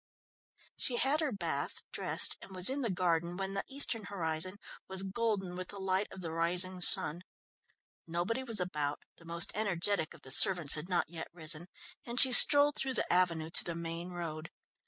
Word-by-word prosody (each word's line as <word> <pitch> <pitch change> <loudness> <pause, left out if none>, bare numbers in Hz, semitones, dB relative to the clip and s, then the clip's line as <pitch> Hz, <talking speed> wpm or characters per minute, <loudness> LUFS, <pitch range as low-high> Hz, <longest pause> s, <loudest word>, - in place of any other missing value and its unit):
She 250 - -1
had 275 +5 0
her 310 -4 -2
bath, 170 -9 -5
dressed, - - +2
and 190 - -13
was 185 +6 +4
in 280 +1 -4
the 235 - -2
garden 175 -2 -2
when 195 0 -5
the 195 - -3
eastern 255 -6 0
horizon 175 -1 -3 0.3
was 190 0 0
golden 195 -3 -4
with 185 0 -7
the 200 - -11
light 190 +1 -2
of 190 - -11
the 165 -2 -6
rising 180 +3 -1
sun. 170 -1 +3 0.9
Nobody 175 +10 -3
was 230 -5 +1
about, 150 -5 -4
the 170 - -19
most 170 +1 -3
energetic 200 -4 -3
of - - -20
the 130 - -9
servants 175 0 +6
had 155 +4 +2
not 175 -2 -2
yet 165 -2 -7
risen, 160 0 -4 0.4
and 240 0 -4
she 260 - +7
strolled 285 +3 +8
through 265 -1 -4
the - - -1
avenue 170 -3 -1
to - - +1
the 170 - -6
main 170 +1 -6
road. 165 -3 -7
180 Hz, 185 wpm, -30 LUFS, 170-205 Hz, 0.9 s, strolled